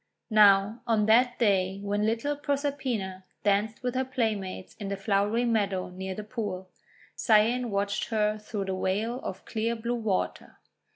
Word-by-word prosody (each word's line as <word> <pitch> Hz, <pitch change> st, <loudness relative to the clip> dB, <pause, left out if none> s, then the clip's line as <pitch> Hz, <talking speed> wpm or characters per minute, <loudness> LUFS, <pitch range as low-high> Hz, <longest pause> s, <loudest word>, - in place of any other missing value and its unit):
Now, 210 Hz, +1 st, +5 dB
on 220 Hz, -2 st, +3 dB
that 240 Hz, +3 st, +4 dB
day 195 Hz, -4 st, +2 dB
when 205 Hz, +1 st, 0 dB
little 230 Hz, +6 st, 0 dB
Proserpina 275 Hz, -10 st, -2 dB, 0.2 s
danced 210 Hz, +3 st, +1 dB
with 250 Hz, -1 st, -1 dB
her 260 Hz, 0 st, +1 dB
playmates 220 Hz, -8 st, -3 dB
in 205 Hz, -, -5 dB
the 200 Hz, -, -2 dB
flowery 205 Hz, +4 st, +1 dB
meadow 200 Hz, -6 st, 0 dB
near 190 Hz, +1 st, -5 dB
the 215 Hz, -, -5 dB
pool, 205 Hz, -5 st, -5 dB, 0.4 s
Cyane 235 Hz, +2 st, +3 dB
watched 200 Hz, 0 st, -1 dB
her 215 Hz, -1 st, 0 dB
through 210 Hz, -1 st, -4 dB
the 190 Hz, 0 st, -2 dB
veil 220 Hz, +7 st, -1 dB
of 190 Hz, 0 st, -6 dB
clear 230 Hz, +1 st, -1 dB
blue 235 Hz, +1 st, -3 dB
water. 220 Hz, -5 st, -2 dB
215 Hz, 155 wpm, -28 LUFS, 195-235 Hz, 0.4 s, Now